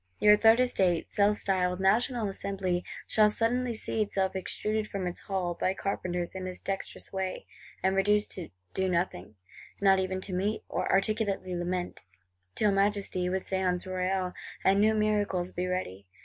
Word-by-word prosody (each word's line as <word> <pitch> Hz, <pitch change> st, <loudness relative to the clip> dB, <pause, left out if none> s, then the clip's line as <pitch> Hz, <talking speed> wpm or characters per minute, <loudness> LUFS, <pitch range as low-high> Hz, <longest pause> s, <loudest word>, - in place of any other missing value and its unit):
Your 210 Hz, 0 st, +7 dB
Third 225 Hz, +2 st, +5 dB
Estate, 190 Hz, -9 st, +1 dB
self 205 Hz, +1 st, +3 dB
styled 180 Hz, -2 st, 0 dB
"National 225 Hz, +4 st, +2 dB
Assembly," 195 Hz, -2 st, -2 dB, 0.2 s
shall 215 Hz, -1 st, +4 dB
suddenly 235 Hz, +2 st, +1 dB
see 220 Hz, 0 st, -2 dB
itself 195 Hz, -2 st, 0 dB
extruded 215 Hz, +3 st, -2 dB
from 195 Hz, -3 st, -4 dB
its 175 Hz, 0 st, -4 dB
Hall, 185 Hz, -3 st, -2 dB
by 185 Hz, +2 st, -1 dB
carpenters, 180 Hz, -3 st, -3 dB
in 190 Hz, -1 st, -5 dB
this 185 Hz, -1 st, -5 dB
dexterous 195 Hz, 0 st, -5 dB
way; 190 Hz, -1 st, -3 dB, 0.4 s
and 190 Hz, 0 st, +2 dB
reduced 205 Hz, +2 st, +2 dB
to 180 Hz, -3 st, -4 dB, 0.2 s
do 190 Hz, 0 st, 0 dB
nothing, 170 Hz, -, -2 dB, 0.4 s
not 195 Hz, -1 st, +5 dB
even 185 Hz, 0 st, -1 dB
to 190 Hz, -, -6 dB
meet, 200 Hz, +4 st, -1 dB
or -, -, -1 dB
articulately 195 Hz, -2 st, 0 dB
lament,—till 95 Hz, -, -3 dB
Majesty, 195 Hz, -2 st, +1 dB
with 190 Hz, +1 st, -1 dB
Séance 185 Hz, -1 st, -1 dB
Royale 185 Hz, 0 st, -1 dB, 0.3 s
and 195 Hz, +1 st, +4 dB
new 220 Hz, +1 st, +4 dB
miracles, 205 Hz, -4 st, 0 dB
be 180 Hz, +1 st, -2 dB
ready! 100 Hz, -, -4 dB
190 Hz, 155 wpm, -29 LUFS, 180-205 Hz, 0.4 s, Your